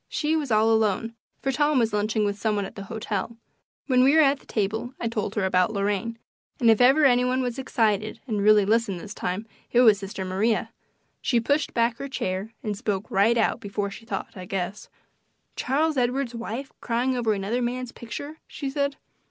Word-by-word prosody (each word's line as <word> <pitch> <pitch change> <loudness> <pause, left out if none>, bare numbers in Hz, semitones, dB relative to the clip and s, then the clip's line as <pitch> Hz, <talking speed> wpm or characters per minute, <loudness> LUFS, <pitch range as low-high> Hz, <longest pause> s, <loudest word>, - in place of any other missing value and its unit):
She 310 +1 0
was 300 -4 -1
all 220 0 +4
alone, 220 0 +1 0.3
for 270 - +1
Tom 295 +1 +2
was 230 -3 +2
lunching 210 +1 +1
with 205 0 0
some 215 +1 -1
one 200 -1 -1
at - - -9
the 200 - -8
hotel. 220 +2 -4 0.5
When 255 -2 +4
we 275 +3 +5
were 320 - +7
at 280 0 +3
the - - -23
table 220 +4 -2
I 235 - -1
told 215 -3 -3
her 205 -3 +1
about 185 +3 +2
Lorraine, 205 +3 -1 0.4
and 235 -2 +6
if 225 - +3
ever 270 +5 +6
any 250 -2 +5
one 255 +1 +1
was 245 +1 -3
excited 220 -4 0
and 215 -5 -1
really 210 0 +5
listened 215 -3 +1
this 200 +4 -8
time 185 +5 -3 0.3
it 245 - +5
was 215 -5 +6
sister 195 -1 -5
Maria. 200 +5 0 0.5
She 240 - +2
pushed 285 +6 0
back 235 0 +2
her 275 - -5
chair, 190 -3 -3
and 210 -2 -2
spoke 205 -2 -3
right 210 +5 +3
out - - +1
before 200 -1 -3
she 225 +3 -11
thought, 200 -4 -5
I 185 -2 -7
guess. 190 +1 -4 0.7
"Charles 300 +3 0
Edward's 250 0 0
wife 235 +3 -5
crying 245 +2 0
over 230 -3 +1
another 205 +5 -1
man's 245 0 -2
picture!" 285 +7 -8
she 275 -3 -5
said. 280 0 -1
225 Hz, 200 wpm, -25 LUFS, 205-255 Hz, 0.7 s, were